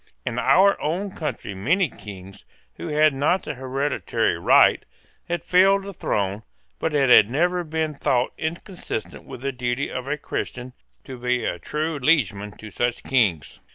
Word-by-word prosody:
In 120 Hz, 0 st, -2 dB
our 195 Hz, +11 st, +4 dB
own 185 Hz, +6 st, -2 dB
country 155 Hz, -, -5 dB
many 165 Hz, -, +1 dB
Kings, 100 Hz, -5 st, -11 dB, 0.3 s
who -, -, -6 dB
had 155 Hz, -1 st, +3 dB
not 145 Hz, +7 st, +1 dB
the -, -, -4 dB
hereditary 130 Hz, -4 st, -1 dB
right, 85 Hz, -, +4 dB, 0.5 s
had 170 Hz, -1 st, -2 dB
filled 195 Hz, +3 st, +4 dB
the 200 Hz, 0 st, -7 dB
throne 100 Hz, -, -2 dB, 0.4 s
but 160 Hz, -2 st, -1 dB
it 135 Hz, -3 st, +3 dB
had 105 Hz, -3 st, +8 dB
never 175 Hz, +7 st, +1 dB
been 160 Hz, -1 st, -2 dB
thought 130 Hz, -3 st, 0 dB
inconsistent 170 Hz, -, -5 dB
with -, -, -9 dB
the 140 Hz, +1 st, -2 dB
duty 125 Hz, +1 st, -2 dB
of 130 Hz, +1 st, -5 dB
a 150 Hz, +1 st, -1 dB
Christian 125 Hz, -3 st, -5 dB, 0.3 s
to 130 Hz, -2 st, -9 dB
be 125 Hz, -1 st, 0 dB
a -, -, -2 dB
true 155 Hz, 0 st, -3 dB
liegeman 115 Hz, -, +1 dB
to 110 Hz, -1 st, -10 dB
such 120 Hz, +3 st, -1 dB
Kings. 105 Hz, -, 0 dB
135 Hz, 160 wpm, -23 LUFS, 120-160 Hz, 0.5 s, had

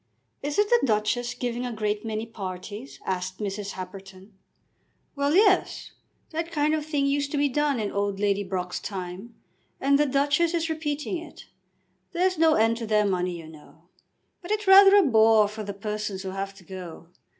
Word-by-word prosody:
"Isn't 295 Hz, +9 st, +1 dB
the 480 Hz, -, +6 dB
Duchess 230 Hz, +1 st, 0 dB
giving 245 Hz, 0 st, -3 dB
a 250 Hz, -, -3 dB
great 210 Hz, -2 st, -2 dB
many 220 Hz, 0 st, -3 dB
parties?" 205 Hz, +3 st, -8 dB
asked 185 Hz, 0 st, -3 dB
Mrs. 200 Hz, -1 st, -4 dB
Happerton. 190 Hz, +1 st, -10 dB, 0.8 s
"Well; 285 Hz, +2 st, +1 dB
yes. 395 Hz, -1 st, +3 dB, 0.4 s
That 330 Hz, +1 st, -3 dB
kind 300 Hz, -1 st, +1 dB
of 310 Hz, -1 st, 0 dB
thing 295 Hz, -2 st, -1 dB
used 285 Hz, 0 st, 0 dB
to -, -, 0 dB
be 285 Hz, 0 st, +3 dB
done 285 Hz, -1 st, 0 dB
in 210 Hz, -2 st, -2 dB
old 200 Hz, -1 st, -2 dB
Lady 205 Hz, 0 st, +1 dB
Brock's 180 Hz, -2 st, -3 dB
time, 190 Hz, +3 st, -7 dB, 0.4 s
and 280 Hz, +1 st, +3 dB
the 295 Hz, -, +3 dB
Duchess 290 Hz, +5 st, +2 dB
is 330 Hz, -1 st, -1 dB
repeating 310 Hz, +2 st, -3 dB
it. 330 Hz, -, -12 dB, 0.7 s
There's 365 Hz, 0 st, +1 dB
no 320 Hz, -1 st, +5 dB
end 225 Hz, +1 st, +2 dB
to 230 Hz, -1 st, -5 dB
their 210 Hz, -1 st, +3 dB
money, 180 Hz, -2 st, -1 dB
you 165 Hz, -2 st, -10 dB
know. 155 Hz, -2 st, -16 dB, 0.5 s
But 350 Hz, -, -10 dB
it's 425 Hz, 0 st, -1 dB
rather 390 Hz, +1 st, +8 dB
a 405 Hz, -, +7 dB
bore 220 Hz, -, +5 dB
for 215 Hz, +1 st, -7 dB
the 205 Hz, -1 st, -5 dB
persons 205 Hz, -1 st, -4 dB
who 190 Hz, -, -4 dB
have 195 Hz, +1 st, -5 dB
to 190 Hz, -, -16 dB
go." 175 Hz, -2 st, -9 dB
220 Hz, 180 wpm, -26 LUFS, 195-295 Hz, 0.8 s, rather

